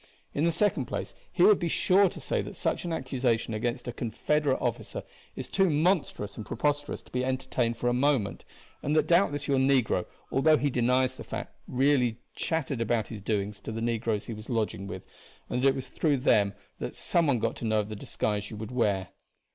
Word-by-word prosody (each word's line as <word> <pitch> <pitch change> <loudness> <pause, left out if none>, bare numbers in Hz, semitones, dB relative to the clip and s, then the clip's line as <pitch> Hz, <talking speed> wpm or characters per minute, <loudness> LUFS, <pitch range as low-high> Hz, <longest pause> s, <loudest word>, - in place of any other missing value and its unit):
In 150 - +1
the 170 - +3
second 170 -7 +1
place 125 - -4 0.2
he 175 - +2
would 210 0 +7
be 175 - -1
sure 190 +4 +4
to - - -9
say - - -1
that - - -7
such - - -1
an 170 - -2
accusation 125 -6 0
against 120 +3 -2
a 120 - -3
Confederate 140 +4 0
officer 120 -3 -3 0.3
is - - -5
too 195 -1 +2
monstrous 150 - +1
and 110 - -4
preposterous 145 +6 -1
to - - -20
be 125 0 0
entertained 130 -3 -1
for 120 - -1
a 120 - +3
moment; 130 -5 +1 0.4
and 150 +2 0
that 155 - +4
doubtless 155 -5 +2
your 135 -2 +3
negro, 130 -8 +2 0.2
although 155 +3 +5
he 145 -1 0
denies 125 +1 +2
the - - -7
fact, - - -6
really 125 -3 +2 0.2
chattered 150 -6 -1
about 115 -1 0
his 110 -3 -7
doings 100 -1 -2
to 105 - -6
the 110 - -4
negroes 115 -2 -1
he 115 - -5
was 110 +1 -10
lodging 110 -5 -1
with, - - -6 0.5
and 125 - 0
that 135 - +4
it 135 - +4
was 130 - -5
through 150 -4 +1
them 100 -6 +3 0.2
that - - -4
some 170 -2 +1
one 135 -4 +3
got 115 0 -1
to - - -5
know 110 -1 +2
of 105 - -7
the 110 - -5
disguise 105 0 -2
you 110 - -7
would 110 +1 -6
wear. 100 -7 +1
125 Hz, 210 wpm, -28 LUFS, 110-145 Hz, 0.5 s, would